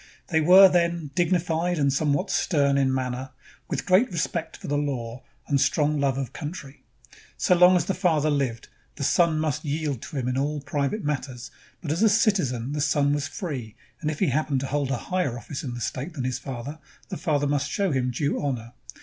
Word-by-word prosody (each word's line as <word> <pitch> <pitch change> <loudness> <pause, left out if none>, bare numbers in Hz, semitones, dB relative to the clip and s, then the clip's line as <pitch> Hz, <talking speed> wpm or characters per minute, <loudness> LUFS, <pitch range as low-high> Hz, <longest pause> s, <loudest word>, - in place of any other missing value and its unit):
They 160 -3 +2
were, 185 +5 +9
then, 170 -4 0
dignified 175 -1 +1
and 140 -2 +2
somewhat 150 +6 0
stern 140 -5 +2
in 135 -1 +2
man 130 -1 -1
ner, 130 +2 -6 0.4
with - - -2
great 190 +6 +4
respect 170 -1 -3
for - - -11
the 145 - 0
law 130 -4 -3 0.3
and 140 -2 +2
strong 150 -1 +2
love 135 -2 +1
of 135 -2 -4
country. 145 -3 -8 0.5
So - - +3
long 180 +1 +6
as 175 - +2
the 195 - 0
father 160 -6 +1
lived, 130 -5 -1 0.3
the 145 - -5
son 165 +2 +3
must 155 -3 -1
yield 145 -4 -2
to 150 - -7
him 125 -2 -2
in 130 +1 0
all 145 +2 -1
private 145 +8 -2
matters; 130 -4 -4 0.3
but 155 - -3
as 165 +5 -1
a 220 - +6
citizen 170 - +1
the 150 0 -2
son 145 -1 +2
was 145 0 -1
free, 130 - -6 0.2
and 155 - -2
if 155 - -3
he 185 -3 +1
happened 140 -1 0
to - - -3
hold 140 0 -1
a 135 - 0
higher 175 -3 -2
office 130 +5 -6
in 125 -6 -5
the 120 - -7
state 140 +8 -4
than 135 -5 -4
his 130 0 -2
father, 135 +3 -7 0.3
the 190 - -4
father 145 -5 0
must 140 0 0
show 200 -3 0
him 130 -2 0
due 140 +4 -1
honor. 120 -4 -3
145 Hz, 210 wpm, -25 LUFS, 135-170 Hz, 0.5 s, were